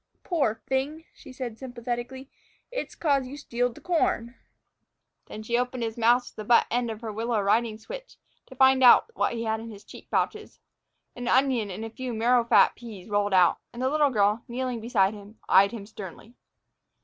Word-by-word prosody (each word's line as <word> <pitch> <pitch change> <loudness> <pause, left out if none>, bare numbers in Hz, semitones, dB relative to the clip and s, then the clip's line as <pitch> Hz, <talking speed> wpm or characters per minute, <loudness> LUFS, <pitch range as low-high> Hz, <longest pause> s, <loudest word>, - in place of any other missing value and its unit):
"Poor 285 - 0
fing!" 280 +4 -2
she - - -14
said 250 -4 -6
sympathetically, 245 +1 -5 0.4
"it's - - -5
'cause 280 -5 +1
you 280 +3 -8
stealed 245 -3 -2
the - - -13
corn." 240 -9 0 0.9
Then 215 - -8
she 235 +2 -1
opened 250 -1 -2
his 225 -1 -3
mouth 240 +2 +3
with - - -14
the 215 - -5
butt 235 +2 +4
end 240 0 0
of 220 0 -6
her 220 -2 -5
willow 225 +1 -1
riding 215 +2 +1
switch, - - -10 0.3
to 260 - -13
find 265 0 +5
out 250 - +7
what - - 0
he 230 -1 -3
had 220 -1 -1
in 230 +1 -8
his 205 -2 -11
cheek - - -13
pouches. - - -2 0.6
An 245 -1 -6
onion 255 -5 +2
and 205 +4 -6
a - - -6
few 255 +1 -5
marrowfat 235 +1 +4
peas 220 -5 -11
rolled 205 -1 +1
out, 180 -2 +4
and 240 - -10
the 260 - +2
little 300 -1 +3
girl, 210 -1 +1
kneeling 250 0 -3
beside 215 -4 +2
him, 210 +1 -13
eyed 195 +1 +6
him 225 -4 -7
sternly. 205 +2 -10
235 Hz, 190 wpm, -26 LUFS, 220-260 Hz, 0.9 s, out